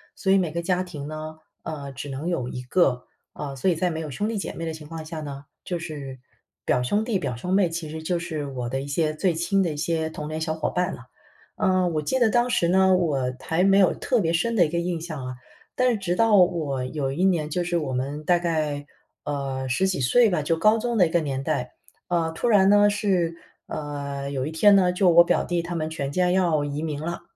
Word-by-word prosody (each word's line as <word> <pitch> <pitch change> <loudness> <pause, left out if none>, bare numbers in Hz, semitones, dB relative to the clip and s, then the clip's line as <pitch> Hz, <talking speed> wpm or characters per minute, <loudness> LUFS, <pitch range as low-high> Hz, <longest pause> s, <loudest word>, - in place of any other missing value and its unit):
所 190 - 0
以 195 - +6
每 175 -5 0
个 170 +2 -2
家 180 +1 0
庭 150 -6 -7
呢， 155 0 -6 0.3
呃， 140 -3 -6
只 135 +2 -7
能 135 +4 -5
有 130 -9 -1
一 125 - -5
个， 125 -1 +1 0.3
呃， 140 -2 -6
所 185 - +1
以 175 - +2
在 180 +3 0
没 160 -2 -4
有 160 -2 -5
兄 205 +10 -2
弟 225 - -2
姐 195 - -4
妹 165 - -5
的 160 - -3
情 155 -1 -10
况 165 0 -7
下 155 0 -6
呢， 140 -1 -7 0.2
就 175 -2 -3
是 145 -6 -7 0.4
表 - - +1
兄 205 - +1
弟、 220 -4 0
表 125 - -3
兄 180 +11 -5
妹， 190 -3 +3
其 165 -1 -5
实 160 +1 -6
就 175 +2 0
是 160 -4 -4
我 125 -3 -4
的 135 - -2
一 135 - -6
些 155 +2 0
最 175 +2 +1
亲 185 +4 +1
的 170 - -1
一 - - -7
些 160 +1 -1
童 150 -1 -6
年 155 0 -3
小 160 0 -1
伙 160 -1 -2
伴 180 +1 -1
了。 125 - -11 0.5
呃， 185 -1 +2
我 155 -2 -1
记 260 - 0
得 235 - +4
当 240 +2 +2
时 175 -8 +2
呢， 190 0 +5
我 140 -8 0
还 165 +3 0
没 195 0 +5
有 190 - +5
特 245 -4 0
别 165 -3 +1
深 200 +8 0
的 190 - +5
一 - - -3
个 170 - -2
印 170 -1 -2
象 155 -6 -6
啊， 130 0 -5 0.4
但 255 0 +3
是 230 - 0
直 180 -3 -1
到 225 0 +4
我 155 -8 +2
有 135 0 -2
一 170 +7 0
年， 170 -5 +1
就 175 +3 -1
是 175 0 0
我 140 -4 -3
们， 140 +4 -3
大 175 +3 +3
概， 155 -4 -1 0.4
呃， 135 -2 -3
十 160 +9 +1
几 185 -4 -1
岁 220 - +4
吧， 175 -6 0
就 165 +3 +1
高 215 +7 +4
中 240 +1 -1
的 180 - +6
一 - - -6
个 170 - +2
年 135 -4 -3
代， 130 -5 -2 0.4
呃， 170 -2 +1
突 240 - -2
然 200 -4 +5
呢， 205 0 +5
是， 185 -5 0 0.3
呃， 140 -2 -5
有 135 -2 -2
一 155 - -4
天 200 +6 +5
呢， 180 -2 +4
就 180 0 +3
我 170 0 +8
表 - - +1
弟 175 -1 -1
他 175 +1 -5
们 160 -2 -2
全 140 -3 -4
家 180 +4 +2
要 175 -5 +2
移 145 +1 -3
民 150 -2 -3
了， 170 +2 -4
165 Hz, 270 characters per minute, -24 LUFS, 145-180 Hz, 0.5 s, 我